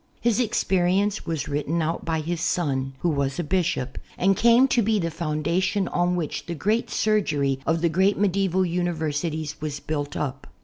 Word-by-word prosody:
His 235 -2 +1
experience 195 -3 +1
was 160 -4 -2
written 150 +3 -1
out 165 +1 -1
by 160 -1 0
his 170 +2 -3
son, 135 -7 0
who 175 - +2
was 140 -3 -1
a 175 - -1
bishop, 155 -7 -1 0.2
and 195 +2 +3
came 235 +5 +5
to 245 - +3
be 220 0 +2
the 165 -4 -1
foundation 170 +5 0
on 175 0 +1
which 165 -4 -3
the 170 - -3
great 215 +9 0
surgery 150 -11 +1
of 160 0 +1
the 170 - +3
great 190 +5 +2
medieval 190 -2 +1
uni 175 0 0
versities 155 0 -3
was 150 -2 -3
built 145 -1 -3
up. 140 -1 -4
170 Hz, 180 wpm, -24 LUFS, 150-190 Hz, 0.2 s, came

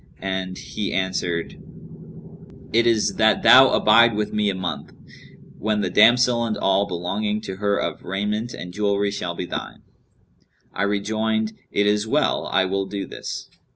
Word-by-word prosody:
and 95 -1 -4
he 105 - -5
answered, 90 -3 -2 1.1
'It 115 +1 +3
is 115 -2 +1
that 110 0 +3
thou 130 +1 +8
abide 115 +1 +4
with 105 0 -2
me 105 -1 +1
a 100 - -2
month, 95 -1 -5 0.7
when 105 0 0
the 95 -3 -2
damsel 120 +4 +4
and 110 -2 -2
all 95 +1 +1
belonging 100 +4 -2
to 95 -3 -7
her 100 0 0
of - - -3
raiment 105 +5 -3
and 90 -4 -8
jewellery 100 0 0
shall 90 -4 -4
be 90 - -4
thine.' 90 - -7 0.9
I - - -4
rejoined, 110 +2 -1 0.2
'It 100 - 0
is 105 +1 +1
well, - - 0
I 95 - +1
will 95 +1 -2
do 100 -1 -5
this.' - - -7
105 Hz, 155 wpm, -22 LUFS, 95-110 Hz, 1.1 s, thou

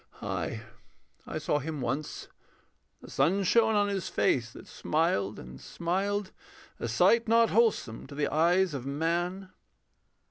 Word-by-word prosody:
Ay, - - -3 0.7
I - - -4
saw 150 -1 0
him 150 +1 -5
once. 135 +5 -4 0.8
The - - -11
sun 195 +5 +2
shone 220 +3 +3
on 205 0 +3
his 195 -2 -3
face, 120 -3 +1
that - - -12
smiled 150 - -1
and 65 +1 -11
smiled, 195 +3 -2 0.5
A - - -3
sight 230 0 +3
not 230 0 +4
wholesome 205 - +1
to 140 - -10
the 145 0 -1
eyes 175 +3 +3
of 135 -3 -4
man. 175 +7 -2
170 Hz, 140 wpm, -29 LUFS, 145-200 Hz, 0.8 s, not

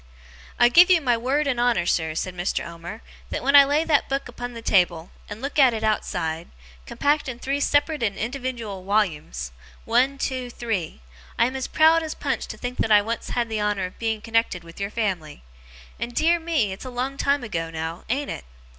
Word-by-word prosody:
'I 240 - +7
give 350 +9 +7
you 360 -2 +6
my 250 -6 +2
word 265 +6 0
and 260 -4 0
honour, 240 -8 +2
sir,' 160 -2 0
said 180 +2 -3
Mr. 175 +1 -2
Omer, 170 +6 -9 0.3
'that - - -4
when 275 +2 +3
I 285 - +11
lay 290 +3 +2
that 305 -3 +2
book 275 0 -2
upon 245 0 -7
the 230 - -7
table, 175 -5 +2 0.2
and 215 +4 -8
look 285 +2 -2
at 255 -4 +6
it 220 - -4
outside; 165 -6 -1 0.4
compact 290 - +1
in 245 - -5
three 275 +3 -2
separate 290 +1 +1
and 200 -4 -1
indiwidual 235 -5 -4
wollumes 160 - -1 0.3
one, 255 +4 +2
two, 255 -2 -3
three; 220 - -4 0.4
I - - +4
am 255 +2 -2
as 265 - -3
proud 320 +1 +5
as 315 -1 -5
Punch - - -2
to - - -7
think 250 0 -5
that 220 - +1
I 205 -1 +7
once 230 +2 -4
had 240 -1 0
the 220 -2 -2
honour 205 -2 0
of 185 - -10
being 225 -2 -1
connected 225 -5 0
with 165 0 -13
your 200 0 -2
family. 185 - -3 0.6
And 240 0 -4
dear 335 +2 +3
me, 320 - 0
it's 195 - -10
a - - -5
long 255 +2 -3
time 280 -1 +1
ago, 165 -8 -3
now, 160 +2 -5
ain't 280 +4 -1
it? - - -7
235 Hz, 210 wpm, -24 LUFS, 190-275 Hz, 0.6 s, I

